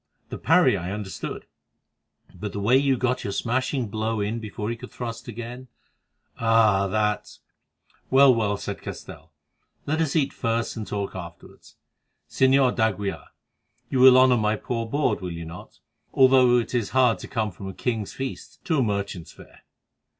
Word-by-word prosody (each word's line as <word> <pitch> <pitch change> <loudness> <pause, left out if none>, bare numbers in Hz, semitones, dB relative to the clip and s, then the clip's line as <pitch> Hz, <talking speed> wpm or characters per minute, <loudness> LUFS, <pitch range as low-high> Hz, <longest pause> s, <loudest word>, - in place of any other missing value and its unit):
The - - -6
parry - - +4
I 90 +2 -4
understood, 105 -2 -6 0.9
but 105 -1 -6
the 100 - -4
way 110 +6 +3
you 135 -1 +3
got 125 +1 -1
your 100 - -3
smashing 130 +2 -1
blow 110 +1 -2
in 105 +3 -2
before 110 0 -5
he - - -3
could 125 +2 -11
thrust 115 -2 -7
again—ah! 115 -3 -2
that——" 105 +1 -1 0.7
"Well, 135 0 +6
well," 105 -3 0
said - - -6
Castell, 80 +2 -9 0.5
"let 155 +3 0
us 155 -2 -1
eat 145 -4 +1
first 115 -1 -2
and 110 -2 -6
talk 100 -1 -3
afterwards. 85 -2 -11 0.5
Señor 130 -1 +3
d'Aguilar, 105 -4 -1 0.6
you 130 - +1
will 130 0 +8
honour 130 -1 +5
my 105 -1 +1
poor 115 +1 -4
board, 145 -2 0
will 90 -1 -4
you 85 0 -6
not, 85 +2 -11 0.4
though 130 -2 +6
it 120 - -2
is 120 -4 0
hard 125 -3 +4
to - - -8
come 110 -2 -2
from 95 +2 -9
a - - -7
king's 110 -5 -2
feast 135 0 -7
to 160 -4 +1
a - - +3
merchant's 100 -6 -3
fare?" - - -17
115 Hz, 165 wpm, -24 LUFS, 105-130 Hz, 0.9 s, will